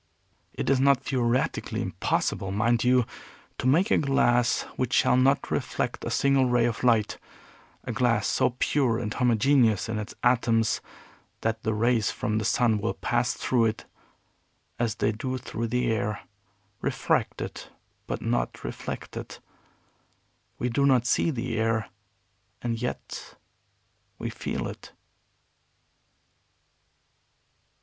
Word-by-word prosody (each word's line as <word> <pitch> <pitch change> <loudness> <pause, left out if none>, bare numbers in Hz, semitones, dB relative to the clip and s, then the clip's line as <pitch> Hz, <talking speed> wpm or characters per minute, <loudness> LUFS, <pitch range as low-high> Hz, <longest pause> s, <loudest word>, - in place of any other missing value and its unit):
It - - -3
is 135 -2 +3
not 135 0 +4
theoretically 125 -2 0
impossible, 95 - -1
mind 115 +3 +2
you, 125 -1 +4 0.5
to - - 0
make 175 - +3
a - - +5
glass 120 -4 +2
which 125 -2 -2
shall - - +4
not 135 +2 +2
reflect - - -2
a - - -2
single 140 -2 +3
ray 120 -1 +3
of 115 0 -2
light, 115 -4 +2 0.6
a - - -4
glass 120 -3 +1
so 120 - +1
pure 130 -6 +2
and 110 -3 -3
homogeneous 120 -3 +3
in 110 -1 -2
its 105 +1 -7
atoms 115 -2 +2 0.6
that 110 0 -1
the 110 0 -1
rays 115 0 +2
from 110 0 -1
the 110 - -3
sun 115 -1 +2
will 115 - -1
pass 120 +1 0
through 120 -3 +1
it 110 0 -2 0.9
as 115 -2 0
they 105 0 +1
do 130 +4 -3
through 115 -2 -4
the 125 +1 0
air, 105 -1 -1 0.6
refracted - - -1 0.4
but - - -4
not - - -1
reflected. - - -6 1.2
We 125 - -1
do 140 +4 +2
not 125 -3 +4
see 145 - +2
the 120 -5 -2
air, 110 -1 0 0.7
and 115 -1 -2
yet 125 - -5 0.8
we - - -4
feel - - -4
it." - - -10
120 Hz, 130 wpm, -27 LUFS, 110-130 Hz, 1.2 s, a